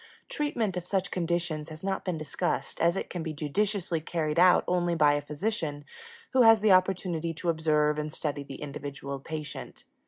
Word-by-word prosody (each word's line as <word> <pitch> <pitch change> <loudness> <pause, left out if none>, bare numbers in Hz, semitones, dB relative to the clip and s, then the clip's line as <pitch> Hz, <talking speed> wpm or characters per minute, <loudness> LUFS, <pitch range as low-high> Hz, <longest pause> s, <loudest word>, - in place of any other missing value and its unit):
Treatment 235 -10 -1
of 180 0 -5
such 195 -1 -1
conditions 170 -3 -1
has 155 +2 -9
not 195 0 -1
been 180 -3 -2
discussed, 155 -1 -2
as 170 +3 +3
it - - -3
can 175 - -5
be 160 -1 -4
judiciously 170 +3 -1
carried 155 -1 -1
out 180 0 +6
only 175 -1 +1
by 150 -3 +5
a 145 - 0
physician 150 -1 -3 0.5
who 260 - +4
has 225 -2 +8
the 215 -1 +4
opportunity 185 -3 +2
to 170 +2 -2
observe 150 -2 +2
and 150 0 -3
study 145 -2 -3
the 140 +1 -8
individual 140 -1 -6
patient. 150 +1 -7
165 Hz, 180 wpm, -28 LUFS, 150-185 Hz, 0.5 s, has